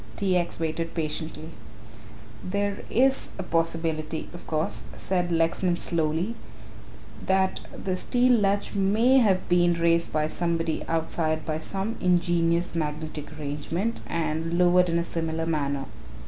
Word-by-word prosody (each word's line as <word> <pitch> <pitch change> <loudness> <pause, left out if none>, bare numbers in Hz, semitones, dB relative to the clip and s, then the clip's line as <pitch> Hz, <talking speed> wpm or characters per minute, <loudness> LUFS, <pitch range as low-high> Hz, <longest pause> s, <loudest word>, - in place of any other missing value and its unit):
T. 190 -2 +1
X. 175 -2 0
waited 165 +1 -2
patiently. 155 0 -4 0.9
"There 200 +1 -1
is 265 +3 +3
a 190 - -3
possibility, 165 -2 -1
of 175 - -11
course," 155 0 -1
said 180 -2 -1
Lexman 170 +2 +1
slowly, 165 +5 0 0.9
"that 190 0 +2
the 185 -1 -3
steel 250 +6 +2
latch 205 -3 +1
may 215 +7 +4
have 195 -6 +2
been 175 -1 +4
raised 170 0 +2
by 155 -1 +1
somebody 165 0 -1
outside 160 -1 0
by 155 0 -2
some 195 +7 -3
ingenious 175 -1 +2
magnetic 155 -1 -3
arrangement 155 +9 -3
and 165 +1 -1
lowered 180 0 +5
in 165 - +1
a 170 - +1
similar 165 -1 -2
manner." 140 -4 -1
170 Hz, 130 wpm, -26 LUFS, 160-185 Hz, 0.9 s, lowered